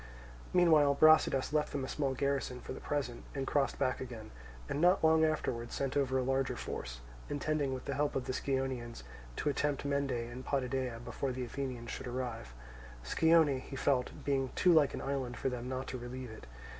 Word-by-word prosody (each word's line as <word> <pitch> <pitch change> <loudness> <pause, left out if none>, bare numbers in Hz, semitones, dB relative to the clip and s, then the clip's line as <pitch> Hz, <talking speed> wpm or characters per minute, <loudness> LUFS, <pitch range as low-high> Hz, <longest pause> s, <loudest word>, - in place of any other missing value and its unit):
Meanwhile 155 -5 +5
Brasidas 155 -2 +5
left 150 -1 +1
them 140 -2 -1
a - - -6
small 135 -1 -1
garrison 140 -2 -1
for - - -7
the - - -7
present 135 -5 -3
and 135 -1 -1
crossed 140 0 +1
back 130 -2 0
again, 120 -4 -7 0.4
and 145 - -2
not 180 +1 +4
long 160 0 +5
afterwards 125 -7 -1
sent 135 0 -2
over 135 -2 +2
a 130 - +1
larger 135 0 0
force, - - -5 0.3
intending 145 -1 0
with 130 -1 -5
the 140 - -2
help 145 +1 0
of 130 - -1
the 130 - -2
Scionaeans 130 - -2 0.3
to - - 0
attempt 145 -1 -1
Mende 140 0 0
and 120 0 -4
Potidæa 130 -3 -2
before 135 - -2
the 125 0 -3
Athenians 125 -2 -5
should - - -5
arrive; 120 - -4 0.5
Scione, 160 - +4
he 135 - -8
felt, 130 -2 +1 0.2
being 135 -2 +1
too 180 - +5
like 150 -4 +4
an - - -5
island 135 -3 -2
for - - 0
them 125 0 -5
not 130 0 -3
to 130 - -4
relieve 125 0 -6
it. 110 - -11
135 Hz, 195 wpm, -33 LUFS, 125-145 Hz, 0.5 s, Meanwhile